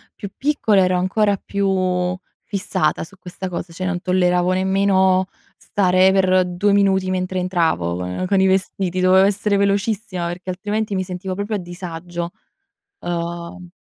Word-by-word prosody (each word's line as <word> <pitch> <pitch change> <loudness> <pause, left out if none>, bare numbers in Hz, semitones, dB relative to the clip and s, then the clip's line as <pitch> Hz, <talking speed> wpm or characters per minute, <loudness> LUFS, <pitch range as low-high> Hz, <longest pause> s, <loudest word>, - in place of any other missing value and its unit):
più 200 - -7
piccola 225 -9 +2
ero 185 0 +2
ancora 200 +2 +1
più 185 -2 -1 0.3
fissata 195 -2 -1
su 195 +5 -13
questa 185 +1 -7
cosa, 175 0 -5
cioè 185 +3 -4
non 180 -1 -2
tolleravo 180 -1 +2
nemmeno 190 0 +2 0.3
stare 185 -1 +3
per 185 -1 +3
2 180 +3 +1
minuti 190 -2 +2
mentre 185 0 -1
entravo 165 - 0
con 90 - -3
con 195 +1 +2
i 190 - +4
vestiti, 190 -1 0
dovevo 185 +1 +5
essere 200 0 +1
velocissima, 200 -2 0
perché 175 +2 -6
altrimenti 205 +3 -2
mi 185 - 0
sentivo 185 0 -5
proprio 205 +2 -3
a - - 0
disagio. 175 -1 -6 0.7
Uhm 170 +1 -5
185 Hz, 150 wpm, -20 LUFS, 180-195 Hz, 0.7 s, dovevo